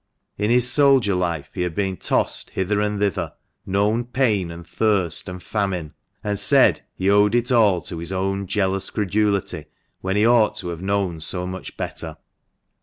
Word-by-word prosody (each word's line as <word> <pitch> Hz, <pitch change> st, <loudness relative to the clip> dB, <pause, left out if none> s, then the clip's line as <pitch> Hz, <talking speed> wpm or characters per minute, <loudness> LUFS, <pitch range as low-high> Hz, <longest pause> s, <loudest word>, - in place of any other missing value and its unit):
In 105 Hz, +1 st, -1 dB
his 125 Hz, +1 st, +4 dB
soldier 135 Hz, -5 st, +4 dB
life 85 Hz, -6 st, -2 dB
he 90 Hz, -, -4 dB
had 90 Hz, -2 st, -2 dB
been 95 Hz, -2 st, -1 dB
tossed -, -, -1 dB
hither 100 Hz, +2 st, -1 dB
and 105 Hz, 0 st, -1 dB
thither 100 Hz, -1 st, -1 dB, 0.2 s
— -, -, -50 dB
known 110 Hz, +4 st, +1 dB
pain, 115 Hz, -8 st, 0 dB
and 85 Hz, +1 st, -9 dB
thirst, 95 Hz, -2 st, 0 dB
and 90 Hz, 0 st, -8 dB
famine; 95 Hz, -7 st, -2 dB, 0.3 s
and 105 Hz, -1 st, -1 dB
said -, -, +5 dB
he 95 Hz, -, -2 dB
owed 105 Hz, +2 st, +4 dB
it 120 Hz, +2 st, +1 dB
all 105 Hz, -7 st, +4 dB
to 85 Hz, -, -6 dB
his 85 Hz, +2 st, -5 dB
own 95 Hz, +1 st, -2 dB
jealous 95 Hz, -1 st, -1 dB
credulity, 105 Hz, -1 st, -1 dB, 0.3 s
when 95 Hz, +1 st, -2 dB
he 105 Hz, +1 st, +3 dB
ought 115 Hz, -2 st, +4 dB
to 90 Hz, -, -4 dB
have 85 Hz, -1 st, -6 dB
known 95 Hz, -3 st, -1 dB
so 90 Hz, +3 st, -2 dB
much 95 Hz, 0 st, -7 dB
better. -, -, -5 dB
100 Hz, 180 wpm, -22 LUFS, 90-105 Hz, 0.3 s, said